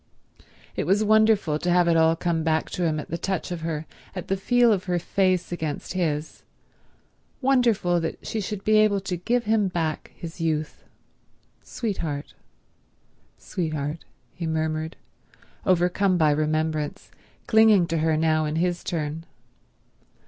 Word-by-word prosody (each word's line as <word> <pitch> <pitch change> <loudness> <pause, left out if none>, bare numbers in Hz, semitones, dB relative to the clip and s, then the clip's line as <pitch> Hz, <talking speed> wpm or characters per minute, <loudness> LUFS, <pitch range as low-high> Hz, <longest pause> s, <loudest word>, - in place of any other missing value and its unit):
It - - -2
was 200 +4 +3
wonderful 215 -7 +3
to 175 - -2
have 175 0 +4
it 170 - +3
all 160 0 +4
come 165 -1 -1
back 160 0 0
to 180 - -2
him 155 -2 0
at 150 - -8
the 170 - -2
touch 190 0 -2
of 175 -2 -4
her, 160 -1 -3 0.3
at 185 - -6
the 195 - +2
feel 240 +4 +3
of 190 -3 -2
her 180 -2 0
face 185 0 0
against 160 -3 -4
his—wonderful 185 - -2
that 165 -1 -5
she 220 - -2
should 200 0 -5
be 215 0 +4
able 215 -2 +4
to 190 -1 -3
give 235 +8 0
him 215 -2 +2
back 165 -4 -3
his 165 0 -8
youth. 155 -2 -2 0.8
"Sweetheart—sweetheart," 155 - -6 0.3
he 170 - -5
murmured, 160 0 -2 0.7
overcome 185 +1 +2
by 155 -3 +4
remembrance, 155 0 -1 0.3
clinging 220 -5 +5
to 165 -1 -1
her 160 0 +2
now 155 0 +2
in 150 0 -2
his 175 +1 0
turn. 160 -1 -3
170 Hz, 140 wpm, -25 LUFS, 155-195 Hz, 0.8 s, clinging